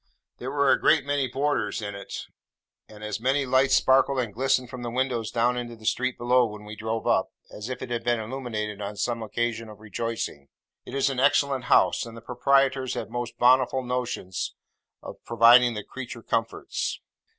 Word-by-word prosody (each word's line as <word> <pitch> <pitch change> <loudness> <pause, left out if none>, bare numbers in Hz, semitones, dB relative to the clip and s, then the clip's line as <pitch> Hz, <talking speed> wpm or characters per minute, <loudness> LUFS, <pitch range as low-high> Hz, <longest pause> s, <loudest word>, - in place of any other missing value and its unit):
There 125 - -4
were 140 -1 +3
a - - +3
great 150 -4 +4
many 145 -2 0
boarders 135 -4 -1
in 100 -2 -5
it; 100 0 -7 0.6
and 105 0 -12
as 105 0 -3
many 135 +4 +1
lights 130 +1 +4
sparkled 135 +1 +4
and 120 -5 -1
glistened 130 +2 +1
from 125 0 -8
the 120 - -4
windows 120 -2 -1
down 120 +1 +1
into 120 -1 -5
the 110 -1 -15
street 130 +3 0
below, 125 +1 +3
when 105 -1 -9
we 105 +1 -8
drove 110 +1 -3
up, - - +2 0.2
as 105 +3 -7
if 130 -1 -5
it 125 - -7
had 120 -1 -2
been 120 -1 +1
illuminated 110 -3 -4
on 100 +1 -5
some 115 +3 -2
occasion 115 0 -2
of 105 -1 -12
rejoicing. 110 -9 -4 0.4
It - - -7
is 140 0 +2
an 130 - -3
excellent 140 -1 +2
house, - - +4
and 115 0 -10
the - - -10
proprietors 130 +2 +1
have - - -5
most 120 -1 -4
bountiful 130 +1 +4
notions 125 -7 -3 0.5
of - - -10
providing 120 +1 +6
the 105 - -4
creature 125 -2 -8
comforts. 115 0 -2
120 Hz, 190 wpm, -26 LUFS, 110-130 Hz, 0.6 s, providing